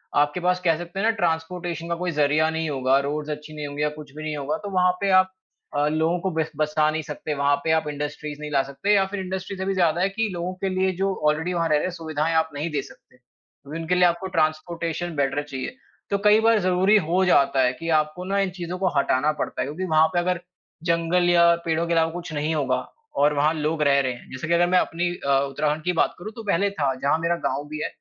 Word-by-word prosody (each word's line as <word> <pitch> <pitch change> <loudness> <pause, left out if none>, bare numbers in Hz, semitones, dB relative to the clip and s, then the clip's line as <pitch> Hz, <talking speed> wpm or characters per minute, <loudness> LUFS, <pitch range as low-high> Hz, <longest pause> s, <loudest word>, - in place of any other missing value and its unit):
आपके 145 +4 +2
पास 180 +1 +1
कह 165 -2 +3
सकते 175 +3 -7
हैं 215 - +1
ना 225 - +4
ट्रांसपोर्टेशन 170 -1 -2
का 170 - 0
कोई 175 +1 -2
जरिया 150 +1 +2
नहीं 160 0 -2
होगा, 135 -1 +2
रोड्स 150 +2 -3
अच्छी 150 +1 -6
नहीं 150 -1 -4
होंगी 145 +1 -3
या 150 - +2
कुछ 150 -2 -11
भी 155 - -7
नहीं 155 -1 -3
होगा 145 +9 -2
तो 205 - -4
वहाँ 180 -1 +3
पे 200 - +1
आप 185 0 +1 0.5
अ, 145 +1 +2
लोगों 160 +3 +1
को 190 - -1
बस 160 0 -2
बसा 155 0 +2
नहीं 160 +1 -2
सकते, 150 0 -5
वहाँ 140 0 +3
पे 160 - +1
आप 160 -1 +2
इंडस्ट्रीज़ 150 0 -5
नहीं 150 0 -6
ला 140 -2 +3
सकते। 140 +10 -1
या 195 -1 +4
फिर 205 - -3
इंडस्ट्री 190 +1 -5
से 190 - -3
भी 195 - 0
ज़्यादा 175 -2 +2
है 190 - +2
कि 220 +3 -1
लोगों 175 +1 -3
के 195 - +1
लिए 190 0 +1
जो 195 +1 +1
ऑलरेडी 160 +4 +1
वहाँ 170 -1 +1
रह 155 - +4
रहे 150 - +1
हैं, 185 - -2
सुविधाएँ 160 -1 -2
आप 160 0 +2
नहीं 150 +4 -3
दे 145 -2 -1
सकते। - - -17
क्योंकि 140 +4 -12
उनके 165 +2 0
लिए 180 - +3
आपको 175 +2 +1
ट्रांसपोर्टेशन 165 +2 -1
बेटर 140 0 0
चाहिए। 140 - -6 0.3
तो 200 - +1
कई 210 +1 +7
बार 225 -1 +4
ज़रूरी 185 +2 +4
हो 185 +2 +3
जाता 140 -6 +4
है 125 0 +2
कि 165 0 -4
आपको 155 +4 -4
ना 200 +1 0
इन 195 -1 +1
चीज़ों 175 +1 -4
को 190 -1 +2
हटाना 140 +2 +2
पड़ता - - -2
है - - 0
क्योंकि 160 +6 -4
वहाँ 160 -2 +4
पे 175 - +2
अगर 180 0 0 0.5
जंगल 170 +1 +2
या 170 -1 +6
पेड़ों 165 +1 0
के 170 - 0
अलावा 165 0 +2
कुछ 175 -1 -7
नहीं 150 +2 -1
होगा 130 -4 +1 0.5
और 150 +1 +4
वहाँ 150 +2 +2
लोग 155 0 -1
रह 140 -1 +4
रहे 130 -2 -1
हैं। 120 - -14
जैसे 130 +4 -5
कि 170 - +1
अगर 175 +1 +4
मैं 180 0 +5
अपनी 175 +1 -1 0.2
अ, 135 -1 +4
उत्तराखंड 150 +2 -1
की 180 - +1
बात - - -4
करूँ 210 +5 -7
तो 225 - -8
पहले 200 0 +1
था 140 -8 0
जहाँ 140 +3 +2
मेरा 170 +1 +1
गाँव 145 - -2
भी 155 0 -4
है - - 0
160 Hz, 255 wpm, -24 LUFS, 150-180 Hz, 0.5 s, कई